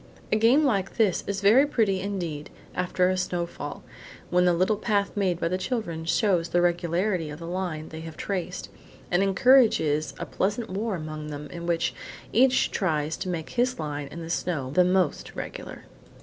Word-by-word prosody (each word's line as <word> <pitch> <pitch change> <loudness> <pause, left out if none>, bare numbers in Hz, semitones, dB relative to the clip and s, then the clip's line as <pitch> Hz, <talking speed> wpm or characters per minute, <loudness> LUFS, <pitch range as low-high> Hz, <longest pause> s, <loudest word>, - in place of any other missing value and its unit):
A - - +4
game 235 +8 +5
like 195 -8 0
this 210 -6 +2
is 200 0 -2
very 235 +8 +6
pretty, 210 -8 +1
indeed, 175 -7 -4 0.2
after 180 0 +1
a 185 - +1
snowfall, 175 -2 -4 0.5
when 180 0 +4
the 180 - +4
little 185 +5 +2
path 200 -3 0
made 185 -4 0
by - - 0
the 185 +2 -1
children 180 -6 -3
shows 175 -1 +2
the 175 - +2
regularity 175 0 +1
of 150 - -7
the 170 - -8
line 170 -3 -3
they 160 - -8
have 160 -1 -9
traced, 185 -2 -4 0.4
and 180 +1 +3
encourages 190 - +4
a - - -4
pleasant 205 +2 -2
war 205 +2 -1
among 155 -2 -6
them 150 0 -6
in 170 0 -6
which 170 -1 +1 0.4
each 260 +3 +4
one - - -18
tries 160 -5 0
to 185 - -4
make 165 -3 -4
his 250 +1 +1
line 145 -2 -4
in 170 +4 -8
the 165 - -5
snow 145 -8 -2
the 180 +5 +5
most 180 -3 0
regular. - - -7
180 Hz, 185 wpm, -26 LUFS, 165-200 Hz, 0.5 s, very